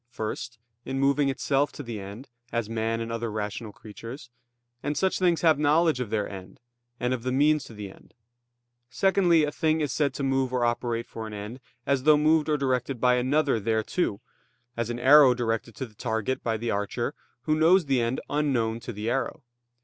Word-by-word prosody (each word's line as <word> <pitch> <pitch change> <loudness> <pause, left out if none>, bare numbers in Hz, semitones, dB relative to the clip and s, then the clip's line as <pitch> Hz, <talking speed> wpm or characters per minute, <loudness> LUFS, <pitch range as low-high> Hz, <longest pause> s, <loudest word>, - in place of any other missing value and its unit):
First, 120 +1 -5 0.3
in 135 - -4
moving 140 +1 +3
itself 135 +2 0
to 145 - -7
the 115 -4 -6
end, 100 +7 -9 0.2
as 115 -2 -1
man 115 0 -2
and 115 0 -4
other 115 0 -3
rational 105 +1 -4
creatures; 115 +5 -10 0.5
and 145 +1 -2
such 190 -1 +1
things 175 -3 +2
have 160 -3 +4
knowledge 155 0 +3
of 125 -4 -3
their 105 -1 -1
end, 95 -2 -10 0.4
and 125 +1 0
of 125 - -3
the 130 +2 -2
means 150 +2 +3
to 115 - -12
the 105 -2 -7
end. - - -20 0.7
Secondly, 175 +1 +3
a 150 - 0
thing 160 0 +1
is 150 -2 -1
said 140 -3 0
to 140 - -3
move 135 -1 +1
or 125 -1 +1
operate 120 0 -1
for 110 -1 -7
an 110 - -8
end, 105 +5 -7 0.3
as 140 -1 +1
though 150 +2 +5
moved 155 +1 +3
or 150 - +2
directed 130 -2 -1
by 125 +1 +4
another 130 +1 +2
thereto, 110 - -1 0.5
as 115 -1 -2
an 120 - -3
arrow 135 0 +7
directed 115 -2 -2
to 130 - -4
the 115 - -17
target 110 +3 -2
by 115 -1 0
the 115 +1 -2
archer, 105 +4 -2 0.3
who 155 - +1
knows 165 +3 +4
the 135 -3 +2
end 115 +2 -1
unknown 130 -6 0
to 120 +1 -7
the 105 0 -5
arrow. 130 +2 -2
125 Hz, 200 wpm, -26 LUFS, 115-145 Hz, 0.7 s, arrow